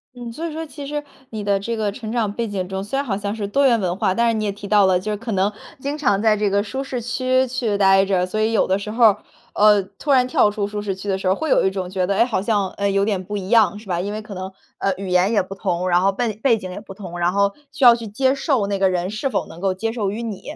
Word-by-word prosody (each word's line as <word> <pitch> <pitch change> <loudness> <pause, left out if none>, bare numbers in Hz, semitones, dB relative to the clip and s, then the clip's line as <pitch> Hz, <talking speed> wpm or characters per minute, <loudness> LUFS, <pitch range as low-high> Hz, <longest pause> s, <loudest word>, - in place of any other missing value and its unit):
嗯， 240 -1 -7
所 330 +6 -4
以 325 - -6
说 320 +1 -5
其 285 -1 -9
实 295 0 -3 0.3
你 215 -2 -5
的 200 -1 +1
这 230 +3 -3
个 210 -2 0
成 220 0 -7
长 220 -4 -1
背 235 0 -2
景 190 -3 -3
中， 190 0 -4
虽 210 +7 -3
然 280 - -1
好 200 -5 -1
像 205 +1 -3
是 205 -2 -3
多 275 +7 +3
元 235 -3 +3
文 180 -2 -1
化， 190 - +1
但 235 0 +2
是 230 - +2
你 215 - -1
也 205 - 0
提 200 0 -9
到 205 -2 +5
了， 180 -1 +3
就 210 +3 -4
是 210 - -2
可 225 0 -5
能 195 +2 +1 0.3
经 280 +2 -3
常 205 -10 +1
在 215 -1 +3
这 210 -1 0
个 200 +1 +1
舒 265 +6 -4
适 255 -2 -4
区 255 +2 +1
去 240 -5 -1
呆 195 -1 +5
着。 190 -2 +1
所 215 +4 -2
以 220 +1 +2
有 220 - +3
的 190 +1 0
时 210 - -6
候 230 +2 0
儿， 210 -1 +4 0.3
呃， 210 -1 +5 0.2
突 300 - -7
然 255 -2 +5
跳 210 - +3
出 205 -1 -2
舒 205 0 -4
适 195 -2 -3
区 195 +2 -9
的 195 - +1
时 190 -1 -3
候 185 - +4
儿， - - -3
会 315 +4 -3
有 - - +4
一 190 - +3
种 190 -2 -4
觉 185 -1 -1
得， 200 - 0
诶， - - +5
好 225 -6 -1
像， 205 -3 0
嗯， 200 0 +1
有 195 +1 +2
点 195 -4 -1
不 205 +2 -4
一 190 0 -6
样， 220 -3 +4
是 215 - -12
吧？ 175 -1 -1
因 200 +2 -3
为 215 - -4
可 215 -1 -9
能， 185 +1 -6 0.3
呃， 195 - +1
语 195 -1 -5
言 180 +4 +3
也 205 -4 +2
不 190 - -8
同， 180 -2 -2
然 175 +1 +3
后 195 +1 +3
笨 220 0 -3
背 235 -5 +4
景 185 -2 -7
也 - - -7
不 195 - -11
同， 175 -4 -8
然 175 +1 +2
后 200 0 +2 0.2
需 275 - -4
要 240 -1 +10
去 230 -2 -7
接 260 +6 +1
受 270 -6 0
那 200 -1 -2
个 190 -1 +3
人 180 +1 -1
是 265 +6 -2
否 - - -1
能 170 - -12
够 190 -1 0
接 225 +4 -2
受 215 -5 -2
于 225 +4 -4
你， 215 -4 -5
205 Hz, 345 characters per minute, -21 LUFS, 195-230 Hz, 0.3 s, 要